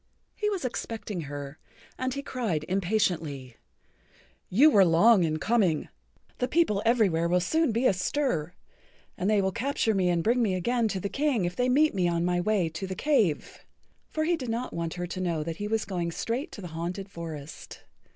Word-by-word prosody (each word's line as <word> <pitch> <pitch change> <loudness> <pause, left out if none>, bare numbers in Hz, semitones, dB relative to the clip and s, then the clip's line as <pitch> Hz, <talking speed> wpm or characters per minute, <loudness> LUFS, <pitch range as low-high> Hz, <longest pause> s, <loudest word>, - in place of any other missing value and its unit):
He 420 - -1
was 385 -9 -3
expecting 220 -6 -4
her, 145 0 -7 0.4
and 255 0 -2
he 280 - -4
cried 210 - -2
impatiently: 170 - -1 0.9
"You 280 +11 +6
were 200 -6 +6
long 185 +4 +5
in 155 -1 0
coming. 195 -5 +1 0.5
The 250 - +1
people 275 -12 +2
everywhere 195 -9 +3
will 180 +1 +3
soon 315 - +1
be 230 +4 0
astir, 185 - 0 0.6
and 190 - -1
they 210 -2 +3
will 190 - +1
capture 235 0 0
me 185 -3 +2
and 170 -1 +1
bring 240 +3 +2
me 200 -5 +1
again 235 +5 +1
to 195 -3 -2
the 200 - -2
King 270 -4 0
if 175 +1 -3
they 250 0 +1
meet 300 +4 +4
me 185 -3 +1
on 170 0 0
my 175 0 +1
way 200 -3 +1
to 165 +4 -5
the 185 - -4
cave." 210 - 0 0.5
(For 310 - -1
he 345 +2 +2
did 260 -7 -6
not 235 +3 -3
want 170 -1 -3
her 175 0 -3
to 175 +1 -5
know 170 -4 -1
that 165 +1 -5
he 205 - -3
was 220 0 0
going 175 -4 -2
straight 235 - -3
to 205 - -8
the 180 - -7
haunted 175 +4 -4
forest.) 160 -5 -9
195 Hz, 195 wpm, -27 LUFS, 170-240 Hz, 0.9 s, You